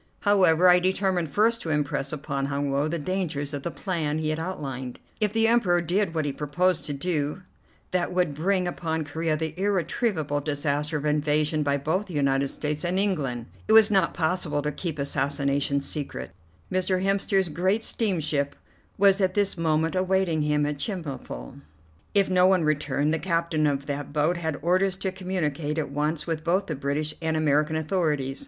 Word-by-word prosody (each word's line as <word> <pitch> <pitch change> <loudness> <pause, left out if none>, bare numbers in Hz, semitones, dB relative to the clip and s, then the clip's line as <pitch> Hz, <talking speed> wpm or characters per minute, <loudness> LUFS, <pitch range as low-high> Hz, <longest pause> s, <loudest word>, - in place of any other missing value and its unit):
However, 185 -4 +4
I 180 0 +7
determined 185 -2 0
first 225 +7 +2
to 165 - -5
impress 145 -2 -1
upon 140 -2 -3
Hun 140 0 -1
Woe 140 +2 +1
the 170 +2 -2
dangers 155 -4 -2
of 145 - -3
the 170 - -3
plan 165 -5 -2
he 155 -1 -1
had 155 +1 -1
outlined. 135 -8 -5 0.2
If 210 -2 +2
the 225 +1 +3
Emperor 210 -7 +3
did 175 +1 0
what 155 -2 0
he 145 - -1
proposed 155 +3 0
to 145 - -3
do, 150 +3 -2 0.5
that 180 -1 0
would 180 -4 +1
bring 180 +4 0
upon 160 -3 -2
Corea 160 +1 -1
the 160 0 -3
irretrievable 185 -5 0
disaster 145 +1 -1
of 145 - -5
invasion 150 +1 +1
by 140 -1 +1
both 160 +9 -1
the 180 - -8
United 140 -1 +2
States 150 +2 -3
and 180 +1 0
England. 145 - 0 0.2
It 220 - +3
was 220 -1 +7
not 195 -2 +2
possible 160 -3 0
to 150 - -1
keep 155 +1 -4
assassinations 140 0 0
secret. 65 - -5 0.4
Mr. 185 0 0
Hemster's 195 -1 +1
great 185 +7 0
steamship 155 -11 -1 0.4
was 200 0 +4
at 185 -1 +1
this 205 -1 +1
moment 160 -1 +1
awaiting 185 -3 +1
him 150 0 +1
at 145 -1 -3
Chemulpo. 140 - -6 0.5
If 200 -1 +4
no 185 0 +4
one 185 -3 +3
returned, 150 0 +1
the 160 - 0
captain 165 -3 0
of 140 -1 -1
that 145 -1 -4
boat 155 +4 +1
had 160 -4 -2
orders 185 +2 +2
to 190 0 -3
communicate 165 -5 -2
at 150 -3 -2
once 150 +2 -1
with 160 -2 -3
both 185 +4 +1
the 165 - -3
British 145 +3 -2
and 160 -1 0
the 155 - +1
American 150 +1 +2
authorities. 155 -5 0
160 Hz, 180 wpm, -26 LUFS, 145-185 Hz, 0.5 s, I